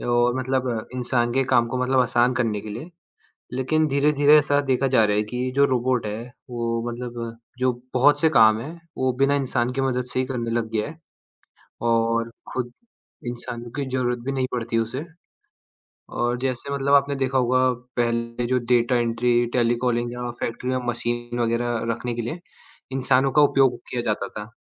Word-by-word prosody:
जो 120 0 +2
मतलब 130 0 0 0.3
इंसान 120 -1 0
के 135 0 +2
काम 120 -2 +3
को 130 - -2
मतलब 130 0 +3
आसान 120 0 +2
करने 115 -5 0
के 110 - -9
लिए। 130 +12 -7 0.6
लेकिन 155 +5 +1
धीरे-धीरे 145 +1 +4
ऐसा 145 -1 +2
देखा 135 +1 +2
जा 130 -4 +4
रहा 105 -1 +1
है 105 - +2
कि 125 +4 -3
जो 140 0 +5
रोबोट 125 -2 0
है 105 +2 -4 0.3
वो 115 -1 -2
मतलब 120 -1 -6 0.2
जो 130 0 +3 0.2
बहुत 145 +3 +4
से 160 - +5
काम 110 -6 +5
हैं 145 - -6 0.3
वो 130 0 +1
बिना 140 +1 +4
इंसान 125 -3 0
की 135 - -1
मदद 125 -2 0
से - - 0
ही 130 - +1
करने 120 -3 -3
लग 115 -1 -1
गया 110 -1 -1
है, 155 - -11 0.8
और 115 0 +1 0.2
खुद 120 -1 -3 0.6
इंसानों 120 0 -6
की 140 - -1
ज़रूरत 125 -1 0
भी 135 - 0
नहीं 130 -1 0
पड़ती 115 -1 -1
उसे 115 +6 -2 1.1
और 120 +1 0
जैसे 130 +1 -3
मतलब 140 0 +2
आपने 140 0 +4
देखा 135 0 0
होगा 125 +1 +2 0.4
पहले 115 0 -1
जो 125 +1 +2
डेटा 120 +1 +2
एंट्री, 120 0 +2
टेलीकॉलिंग 120 0 +1
या 120 0 -4
फैक्ट्री 125 +2 -3
में 130 - 0
मशीन 120 0 -2
वग़ैरह 120 0 0
रखने 120 +1 -3
के 120 - -3
लिए 135 +10 -5 0.5
इंसानों 130 0 +2
का 150 - +5
उपयोग 135 -4 +4
किया 120 - -2
जाता 105 -3 -1
था, 105 +2 -8
125 Hz, 180 wpm, -23 LUFS, 120-130 Hz, 1.1 s, जो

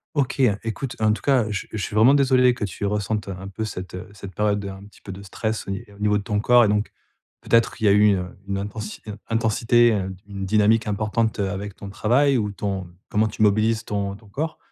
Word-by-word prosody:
OK, 140 -1 0
heu, 110 -6 +3
écoute, 115 +3 -4
en 110 -1 +3
tout - - -5
cas, 130 -5 +3
je 105 -3 -4
je - - -4
suis 105 +1 -4
vraiment 115 +6 +6
désolé 130 -3 +4
que 120 - -6
tu 100 +1 -4
ressentes 105 +1 -1
un 95 0 -6
peu 100 +3 -4
cette, 90 -3 -7
heu, 90 +2 -7
cette 100 -1 -10
période 105 -1 +1
de 100 - -5
un 95 0 -9
petit 105 - -19
peu 95 - -8
de 95 +1 -8
stress, 110 +2 -4
au - - -3
ni 95 +4 -4
au - - -18
niveau 105 0 +2
de 100 - -4
ton 105 -2 -1
corps 120 +2 +5
et - - +2
donc, 105 +1 0 0.5
peut-être, 115 0 +2
qu'il 110 - -3
y - - +6
a - - +6
eu, 105 -1 +5
heu, 90 - -2 0.2
une 100 0 -2
intensi 105 +2 -6 0.3
intensité, 115 +1 +3
heu, 95 -2 -2
une 100 -2 -5
dynamique 110 +2 +3
importante 110 +2 -1
avec 100 0 -3
ton 100 - -9
travail 130 +7 +2
ou 105 -2 -1
ton 95 -2 -4 0.2
comment 110 +1 +2
tu 110 - -6
mobilises 110 +2 +3
ton 100 -1 -2
ton 110 +1 -17
corps. 155 +9 -3
105 Hz, 240 wpm, -23 LUFS, 100-115 Hz, 0.5 s, vraiment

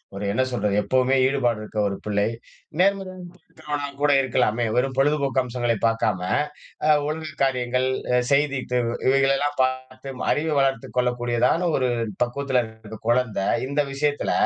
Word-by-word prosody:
ஒரு 100 - -4
என்ன 130 - +1
சொல்றது? 105 -4 -1
எப்பவுமே 130 +5 +2
ஈடுபாடு 125 -5 0
இருக்கிற 110 0 -5
ஒரு 100 - -2
பிள்ளை. 105 -1 0 0.5
நேர்மறையா 190 0 +1
இருக்கிறவன 155 -4 -6
கூட 145 0 +4
இருக்கலாமே? 120 -3 +1
வெறும் 130 +2 +1
பொழுதுபோக்கு 140 -1 +2
அம்சங்களை 120 -2 -1
பார்க்காம, 115 -4 +1 0.7
அ - - +3 0.2
ஒழுங்கு 155 0 -4
காரியங்கள், 125 -1 +1 0.3
அ - - +4
செய்தி 140 -1 +2
தேர்வு, 120 -1 +1
இவைகளை 135 +1 +4
எல்லாம் 145 +1 -2
பார்த்து 130 +1 -4 0.2
அறிவு 155 +1 0
வளர்த்துக் 135 -3 -1
கொள்ளக்கூடியதான 125 +6 +1
ஒரு 130 -1 +1 0.3
பக்குவத்துல 130 +1 0
இருக்கற 110 -1 -11
கொழந்தை. 120 -5 +1 0.2
இந்த 145 +2 +1
விஷயத்துல 145 +1 0
130 Hz, 140 wpm, -23 LUFS, 120-140 Hz, 0.7 s, கூட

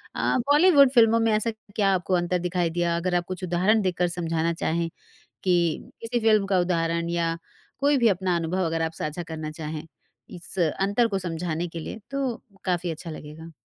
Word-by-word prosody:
अ, - - +1 0.2
बॉलीवुड 295 -4 +6
फ़िल्मों 230 -2 +5
में 225 -1 +2
ऐसा 215 +2 +1 0.2
क्या 200 -2 +3
आपको 185 0 -1
अंतर 175 +1 0
दिखाई 175 -1 0
दिया? 170 0 0
अगर 180 +1 -1
आप 175 - +1
कुछ 185 0 -6
उदाहरण 185 +5 +2
देकर 180 -2 0
समझाना 170 -1 -1
चाहें, 165 0 -1 0.6
कि 175 -4 +1
किसी 235 +1 -2
फ़िल्म 215 -3 +3
का 190 -2 +2
उदाहरण 170 -1 0
या 165 -1 0 0.4
कोई 285 +1 +3
भी 235 -2 +4
अपना 185 -2 +1
अनुभव 170 +3 -1
अगर 165 0 -1
आप 160 0 -1
साझा 155 +2 -4
करना 160 -2 -6
चाहें, 155 0 -6 0.4
इस 180 +2 -8
अंतर 195 +8 +2
को 195 -2 -1
समझाने 170 -1 -3
के 165 - -7
लिए 220 - -7
तो 270 -4 -1 0.3
काफ़ी 175 -2 0
अच्छा 165 +1 -6
लगेगा। 155 +2 -9
175 Hz, 185 wpm, -25 LUFS, 165-200 Hz, 0.6 s, बॉलीवुड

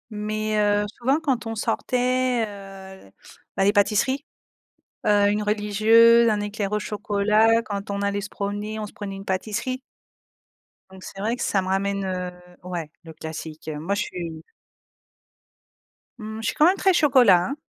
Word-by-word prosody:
mais, 215 +1 -2
heu, 205 0 +2
souvent 270 +5 +2
quand 265 -7 -1
on 225 - -4
sortait, 250 +2 0
heu, 195 - -11 0.5
bah, - - +3
les 200 +1 +3
pâtisseries, 210 +6 +2 0.8
heu, 205 -1 +4
une 210 - 0
religieuse, 220 +3 +5
un 210 -1 0
éclair 205 -1 -3
au - - +2
chocolat, 210 +2 +2
quand 200 -2 -5
on 200 0 -2
allait 200 0 -1
se 205 - -7
promener, 205 +2 -4
on 215 - -3
se - - -12
prenait 200 -2 -6
une 195 0 -9
pâtisserie 215 +7 -2 1.1
donc 190 -1 -13
c'est 195 - -10
vrai 225 +4 0
que - - -4
ça 195 - +1
me 185 - -6
ramène, 195 +1 -1
heu, 180 -1 -3 0.3
ouais, 175 -4 -5
le 165 -1 -11
classique, 160 0 -8
heu, 150 -1 -5
moi 185 +6 -2
je - - -1
suis 165 -3 -7 1.8
mmh, 220 0 -7
je 225 - -6
suis - - -1
quand 305 - +5
même 370 +3 +4
très 385 -1 +3
chocolat, 250 - +5
hein, 275 - -3
205 Hz, 170 wpm, -24 LUFS, 195-225 Hz, 1.8 s, religieuse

